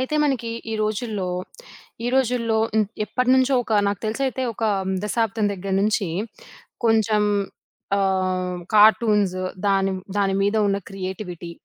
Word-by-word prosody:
అయితే 260 +4 -2
మనకి 255 -5 -1 0.2
ఈ - - -1
రోజుల్లో, 215 -2 -2 0.8
ఈ - - +1
రోజుల్లో 240 -3 +1 0.2
హ్మ్. 215 -2 +3 0.2
ఎప్పటినుంచో 255 +4 +2
ఒక 225 - -4 0.2
నాకు 200 -2 -3
తెలుసైతే 260 +4 -1
ఒక 225 - -3 0.4
దశాబ్దం 220 0 0
దెగ్గర 195 +1 -5
నుంచి 210 -2 +1 0.8
కొంచెం 220 -1 +3 0.7
ఆహ్, 185 -2 0 0.2
కార్టూన్స్ 210 -2 +5 0.3
దాని 195 -1 +2 0.2
దాని 195 -1 +1
మీద 205 +2 +1
ఉన్న 200 0 +1
క్రియేటివిటీ. 185 -3 -6
210 Hz, 120 wpm, -23 LUFS, 195-230 Hz, 0.8 s, కార్టూన్స్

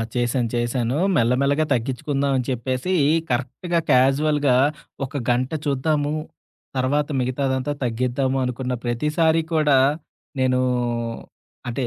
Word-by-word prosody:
చేశాను, 120 -1 0
చేశాను. 120 +2 0 0.2
మెల్ల 120 -3 +3
మెల్లగా 145 +3 +2
తగ్గించుకుందాం 135 +3 -1
అని 125 - -1
చెప్పేసి, 130 +7 -2 0.4
కరెక్ట్‌గా 135 +8 -1
క్యాజువల్‌గా 140 +1 +3 0.5
ఒక 140 +2 -6
గంట 125 +1 +1 0.2
చూద్దాము. 145 +1 0 0.6
తర్వాత 145 +4 +1
మిగతాదంతా 130 +2 -1
తగ్గిద్దాము 125 +3 0
అనుకున్న 125 0 -2
ప్రతిసారి 150 +7 +1
కూడా 150 -3 +4 0.6
నేను 130 -1 +2 1.1
అంటే, 120 +2 -2
130 Hz, 100 wpm, -22 LUFS, 125-145 Hz, 1.1 s, కూడా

